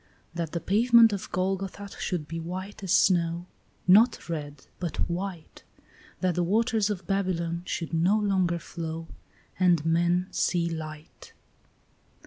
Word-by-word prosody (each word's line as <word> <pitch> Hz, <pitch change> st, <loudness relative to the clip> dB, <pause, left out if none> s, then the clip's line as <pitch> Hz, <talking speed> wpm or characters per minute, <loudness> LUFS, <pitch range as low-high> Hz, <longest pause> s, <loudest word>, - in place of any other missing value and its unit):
That 165 Hz, -2 st, -4 dB
the 170 Hz, -, -1 dB
pavement 230 Hz, +3 st, +5 dB
of 200 Hz, -, -5 dB
Golgotha 195 Hz, +2 st, -2 dB
should 170 Hz, -5 st, -2 dB
be 165 Hz, +2 st, -5 dB
white 185 Hz, +4 st, -6 dB
as 190 Hz, -, -2 dB
snow, 170 Hz, -3 st, +3 dB, 0.4 s
Not 220 Hz, +6 st, +5 dB
red, 145 Hz, -4 st, -5 dB
but 175 Hz, -4 st, -4 dB
white; 175 Hz, -1 st, -5 dB, 0.6 s
That 185 Hz, -1 st, +2 dB
the 175 Hz, -, 0 dB
waters 220 Hz, +3 st, +1 dB
of 190 Hz, -4 st, -4 dB
Babylon 170 Hz, -3 st, -1 dB
should 165 Hz, -1 st, -4 dB
no 175 Hz, +6 st, +3 dB
longer 190 Hz, -5 st, +1 dB
flow, 165 Hz, -1 st, -6 dB, 0.5 s
And 175 Hz, -4 st, +3 dB
men 175 Hz, +2 st, +2 dB
see 170 Hz, -2 st, +1 dB
light. 155 Hz, -2 st, -8 dB
175 Hz, 130 wpm, -27 LUFS, 165-195 Hz, 0.6 s, pavement